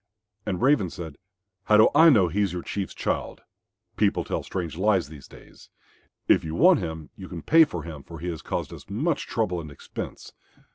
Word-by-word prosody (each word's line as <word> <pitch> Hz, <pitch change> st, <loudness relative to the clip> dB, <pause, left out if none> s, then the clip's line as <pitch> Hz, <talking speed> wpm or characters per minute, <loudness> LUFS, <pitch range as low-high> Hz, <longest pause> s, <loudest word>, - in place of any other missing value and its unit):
And 90 Hz, +2 st, -2 dB
Raven 130 Hz, -9 st, +3 dB
said, 80 Hz, -5 st, -8 dB, 0.5 s
"How 105 Hz, -, +5 dB
do 110 Hz, -, +7 dB
I 165 Hz, +1 st, +7 dB
know 105 Hz, -, +5 dB
he 95 Hz, +5 st, -1 dB
is 100 Hz, -4 st, 0 dB
your 90 Hz, -, -4 dB
Chief's 100 Hz, -2 st, -4 dB
child? -, -, -3 dB, 0.6 s
People -, -, +2 dB
tell -, -, -3 dB
strange 85 Hz, -5 st, -5 dB
lies 95 Hz, -4 st, +1 dB
these 75 Hz, -4 st, -12 dB
days. -, -, -17 dB, 0.6 s
If -, -, +4 dB
you 80 Hz, 0 st, -4 dB
want 180 Hz, -1 st, +6 dB
him 80 Hz, -2 st, -6 dB
you 95 Hz, -2 st, -10 dB
can 85 Hz, -3 st, -7 dB
pay 165 Hz, 0 st, +6 dB
for 85 Hz, -, -6 dB
him, 80 Hz, -3 st, -8 dB
for 85 Hz, +4 st, -11 dB
he 85 Hz, +3 st, -5 dB
has 80 Hz, -2 st, -5 dB
caused -, -, -4 dB
us -, -, -12 dB
much 140 Hz, +9 st, -1 dB
trouble 95 Hz, -7 st, -1 dB
and 75 Hz, -, -9 dB
expense." 70 Hz, -, -8 dB
90 Hz, 200 wpm, -25 LUFS, 80-110 Hz, 0.6 s, do